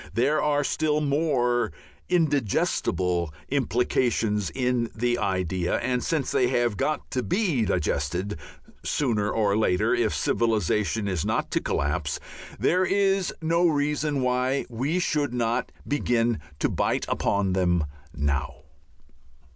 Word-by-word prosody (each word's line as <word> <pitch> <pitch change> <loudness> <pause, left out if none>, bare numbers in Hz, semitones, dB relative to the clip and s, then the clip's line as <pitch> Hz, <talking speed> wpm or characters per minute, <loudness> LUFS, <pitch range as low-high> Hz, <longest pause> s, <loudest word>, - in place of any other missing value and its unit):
There 145 +6 +2
are 145 -1 +2
still 150 +1 +1
more 140 - +1 0.4
indigestible 105 - +1 0.2
implications 115 -5 +1
in 125 -2 0
the 120 +1 0
idea, 95 -2 0
and, 125 -1 -1
since 160 -6 -1
they 125 - +3
have 120 -3 +1
got 150 +9 -2
to 130 - 0
be 170 - +1
digested 85 +3 -1 0.4
sooner 110 -7 0
or 105 -3 +1
later 90 -4 +2
if - - +1
civilization 105 -1 +1
is 90 -5 -1
not - - -1
to - - +1
collapse, 75 +1 -1 0.4
there 180 +2 +3
is 195 0 +2
no 170 +2 +3
reason 150 -2 0
why 125 +2 +1
we 130 +8 -1
should 150 -7 0
not 120 0 0 0.2
begin 120 -5 +1 0.2
to - - +1
bite - - 0
upon 100 -2 0
them 90 -3 +2 0.3
now. 70 -3 -2
120 Hz, 125 wpm, -26 LUFS, 100-145 Hz, 0.4 s, they